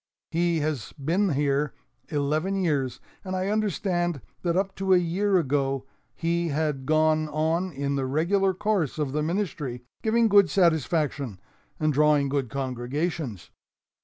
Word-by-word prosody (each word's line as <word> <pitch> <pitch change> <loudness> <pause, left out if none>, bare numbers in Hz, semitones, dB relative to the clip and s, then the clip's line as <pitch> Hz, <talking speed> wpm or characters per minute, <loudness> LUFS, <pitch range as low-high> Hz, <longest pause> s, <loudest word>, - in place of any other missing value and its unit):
He 170 -1 +1
has 145 -7 -3
been 170 +6 0
here 140 0 0 0.3
eleven 155 +6 0
years, 140 -7 0 0.2
and 185 -1 -4
I 185 +1 -1
understand 185 -6 0 0.2
that 170 0 0
up 195 0 0
to 190 -1 +3
a - - +6
year 185 +3 +2
ago 135 -3 0 0.3
he 170 +1 0
had 150 -3 -1
gone 155 0 +3
on 160 +5 0
in 140 -1 -2
the 135 -1 -1
regular 185 +7 +2
course 190 - 0
of 150 -3 -1
the 150 +2 -1
ministry, 150 -8 -2 0.2
giving 230 +1 +3
good 200 -3 +6
satisfaction 150 - +1 0.4
and 155 -1 +2
drawing 150 -1 +3
good 135 -3 -1
congregations. 130 - -3
155 Hz, 140 wpm, -26 LUFS, 140-180 Hz, 0.4 s, a